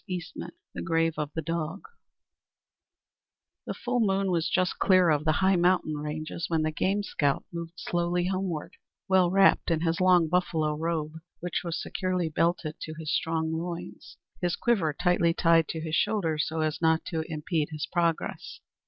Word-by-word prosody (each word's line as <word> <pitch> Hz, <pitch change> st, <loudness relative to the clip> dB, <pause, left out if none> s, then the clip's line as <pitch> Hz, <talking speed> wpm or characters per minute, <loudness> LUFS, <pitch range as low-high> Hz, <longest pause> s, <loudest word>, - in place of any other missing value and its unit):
VII 180 Hz, -3 st, -3 dB, 0.5 s
THE -, -, -5 dB
GRAVE 165 Hz, -1 st, +1 dB
OF 150 Hz, -1 st, -2 dB
THE 160 Hz, -, -2 dB
DOG 165 Hz, +3 st, -3 dB, 1.9 s
The -, -, -3 dB
full 250 Hz, 0 st, -1 dB
moon 195 Hz, -3 st, +1 dB
was 165 Hz, -2 st, +1 dB
just 185 Hz, -1 st, 0 dB
clear 185 Hz, -3 st, +5 dB
of 150 Hz, 0 st, +1 dB
the 155 Hz, -, +4 dB
high 190 Hz, 0 st, +5 dB
mountain 175 Hz, -2 st, +2 dB
ranges 155 Hz, +2 st, -4 dB
when 160 Hz, -2 st, +1 dB
the 155 Hz, -, 0 dB
game 195 Hz, +6 st, 0 dB
scout 145 Hz, -7 st, 0 dB
moved 170 Hz, 0 st, -6 dB
slowly 175 Hz, 0 st, -1 dB
homeward, 185 Hz, -4 st, -3 dB, 0.3 s
well 185 Hz, -2 st, +4 dB
wrapped 195 Hz, +1 st, +4 dB
in 165 Hz, -2 st, +1 dB
his 165 Hz, +1 st, 0 dB
long 180 Hz, -3 st, +5 dB
buffalo 160 Hz, -3 st, +1 dB
robe, 160 Hz, 0 st, -3 dB, 0.2 s
which 175 Hz, +1 st, -2 dB
was 170 Hz, -2 st, -3 dB
securely 185 Hz, -3 st, -2 dB
belted 165 Hz, -1 st, 0 dB
to 155 Hz, -, -6 dB
his 160 Hz, -1 st, -3 dB
strong 160 Hz, 0 st, 0 dB
loins; 175 Hz, +2 st, -6 dB, 0.2 s
his 175 Hz, -1 st, +1 dB
quiver 200 Hz, -10 st, +1 dB
tightly 170 Hz, +1 st, +2 dB
tied 165 Hz, -2 st, +4 dB
to 160 Hz, -, -4 dB
his 160 Hz, 0 st, -5 dB
shoulders 165 Hz, -5 st, +1 dB
so 160 Hz, 0 st, -2 dB
as 155 Hz, 0 st, -1 dB
not 160 Hz, 0 st, +2 dB
to 160 Hz, -3 st, -2 dB
impede 155 Hz, 0 st, -1 dB
his 155 Hz, -1 st, -4 dB
progress. 170 Hz, 0 st, -2 dB
165 Hz, 170 wpm, -28 LUFS, 155-180 Hz, 1.9 s, clear